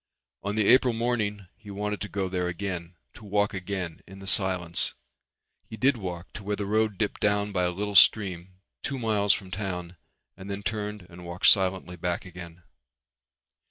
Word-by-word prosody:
On 100 +1 -2
the 110 -2 +2
April 125 +1 +6
morning 110 -4 -1
he 110 -2 -14
wanted 105 +1 -3
to 105 - -4
go 100 -2 -1
there 90 -1 -1
again, 90 -1 -4 0.2
to - - -14
walk 105 0 +1
again 90 -3 -4
in 95 - -11
the 95 - -10
silence. 95 -3 +1 0.7
He 110 - -7
did 135 +5 +3
walk 90 -5 -6
to 105 - -7
where 105 +1 -1
the 100 - -3
road 110 0 +1
dipped 105 0 -1
down 105 0 +2
by 90 -2 +1
a - - +2
little 100 +3 -3
stream 95 -2 +4 0.3
two 140 - -3
miles 105 -4 +2
from 95 -1 -1
town 90 -3 -4 0.4
and 95 +1 -10
then 100 0 -4
turned 105 -2 -3
and 90 0 -12
walked 85 +1 -4
silently 95 -2 +5
back 90 +1 -2
again. 90 -1 -10
100 Hz, 180 wpm, -27 LUFS, 90-105 Hz, 0.7 s, April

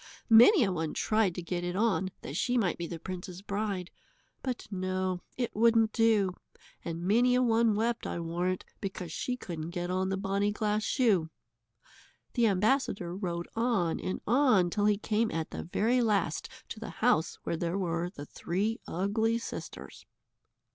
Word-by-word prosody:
Many 245 - +8
a 195 - +1
one 160 -3 -3
tried 215 -5 +1
to 180 - -5
get 175 0 -3
it 175 0 -3
on 200 -3 +1
that 140 - -6
she 245 +8 +1
might 190 -8 0
be 170 - -3
the 170 - -5
prince's 180 +2 -7
bride. 200 -3 -3 0.5
But 255 -2 -4
no, 185 -1 -2 0.2
it 245 -2 -2
wouldn't 225 0 +4
do, 220 -5 +3 0.5
and 170 0 -4
many 240 +6 +4
a 250 - +3
one 230 -2 +3
wept, 230 +2 -1
I - - -3
warrant, 175 +2 -2
because 185 -4 -5
she 250 +9 -3
couldn't 165 -7 -6
get 175 0 -3
on 185 +1 0
the 190 - -1
bonny 200 +1 0
glass 210 0 0
shoe. 200 -12 +2 1.0
The 235 -2 +3
ambassador 200 -3 +1
rode 175 -3 -3
on 225 -8 +1
and 185 - -3
on 235 -8 +4
till 205 +2 +1
he 210 -1 +3
came 220 +2 0
at 160 -4 -3
the - - -5
very 230 +8 +1
last 205 -8 0 0.2
to 220 - -7
the 225 - -6 0.2
house 170 -10 +3
where - - -1
there 170 +2 -2
were 175 -2 -1
the 145 -6 -9
three 205 +10 -2
ugly 215 +5 0
sisters. 235 - -8
195 Hz, 170 wpm, -30 LUFS, 175-225 Hz, 1.0 s, Many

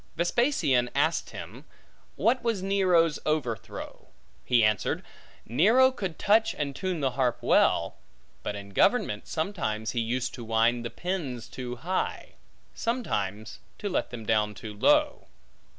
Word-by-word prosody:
Vespasian 170 - +2
asked - - +1
him, - - -9 0.5
What 235 +6 +2
was 225 -5 -1
Nero's 180 -5 +3
overthrow? 135 -8 -3 0.4
He 120 -3 +3
answered, 105 -2 +1 0.4
Nero 220 - +5
could 190 -10 -5
touch 220 +2 +3
and 140 -2 -3
tune 185 -4 -2
the 135 -2 +1
harp 125 -1 0
well; - - +2 0.4
but 105 - -4
in 100 0 -8
government, 105 - +2
sometimes 155 - -2
he 120 - -2
used 120 +3 -1
to 120 - -7
wind 115 +1 +2
the 115 - -3
pins 155 -10 -4
too 125 -1 -6
high, 180 +9 -3 0.4
sometimes 110 - -3 0.2
to 205 - -3
let 185 - -1
them 115 -3 -8
down 105 -1 +1
too 110 +1 -8
low. 295 - +2
135 Hz, 135 wpm, -27 LUFS, -, 0.5 s, Nero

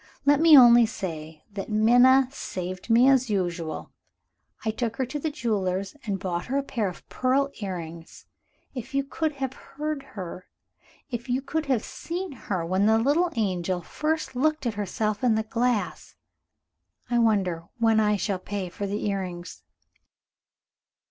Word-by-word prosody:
Let 285 0 +5
me 320 -2 +8
only 240 -2 +8
say 160 -7 -6
that 200 +1 -5
Minna 245 +5 +5
saved 185 -6 -6
me 235 +3 +6
as 260 -3 +4
usual. 175 -5 -2 0.7
I 220 - +2
took 230 0 -3
her 260 - -1
to 265 +4 -5
the 315 - -1
jeweler's 200 -7 -2
and 200 -2 0
bought 175 -2 -3
her 270 - 0
a 280 - 0
pair 230 -6 -2
of 180 - -12
pearl 270 +2 +1
earrings. 170 -4 -7 0.5
If 255 +1 -7
you 275 - +2
could 310 +2 -2
have 265 -2 -3
heard 300 +1 -5 0.2
her, 185 0 -7 0.6
if 240 +1 -5
you 250 +1 +1
could 300 +3 -3
have 255 -5 +1
seen 360 +2 -5
her, 195 -9 -3
when 190 +4 +2
the 220 0 +5
little 295 +9 +2
angel 185 -4 -1
first 310 - -2
looked 310 +3 +1
at 235 - 0
herself 210 +2 -2
in 240 -3 +4
the 220 - 0
glass! 230 0 -1 1.0
I 240 - +3
wonder 190 -7 +1
when 225 -2 +3
I 210 -1 +3
shall 195 -1 -2
pay 195 -1 -4
for 200 +3 -5
the 205 +2 -3
earrings? 185 -3 -4
220 Hz, 160 wpm, -26 LUFS, 190-265 Hz, 1.0 s, me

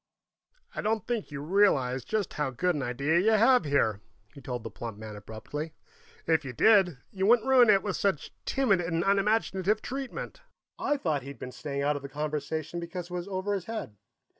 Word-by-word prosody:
"I - - -3
don't 220 +1 0
think 235 -3 -2
you 145 -1 -6
realize 145 - +2
just 215 -3 -2
how 150 -2 -1
good 180 +8 0
an 150 - -2
idea 140 +6 +1
you 220 +5 +3
have, 230 -2 +5
here," 110 -8 +1 0.3
he 140 - -12
told 125 -3 -5
the - - -6
plump 115 -3 -7
man 110 -1 -8
abruptly. 145 +10 -7 0.5
"If 160 -2 +2
you 130 -2 -6
did, 190 - +5
you 190 0 0
wouldn't 235 +2 +5
ruin 255 -3 +6
it 195 -2 +5
with 205 -3 -2
such 195 -7 -1
timid 215 -9 +2
and 165 0 -1
unimaginative 200 0 +2
treatment." 270 - -5 0.4
I 290 - +1
thought 155 - -1
he'd 140 +2 -9
been 125 - -7
staying 140 0 -4
out 145 +1 +2
of - - -8
the 140 - -8
conversation 150 +3 -3
because 175 +1 -6
it - - -6
was 175 +1 -4
over 195 +1 -2
his 195 -3 -3
head. 220 - -5
170 Hz, 195 wpm, -29 LUFS, 140-205 Hz, 0.5 s, ruin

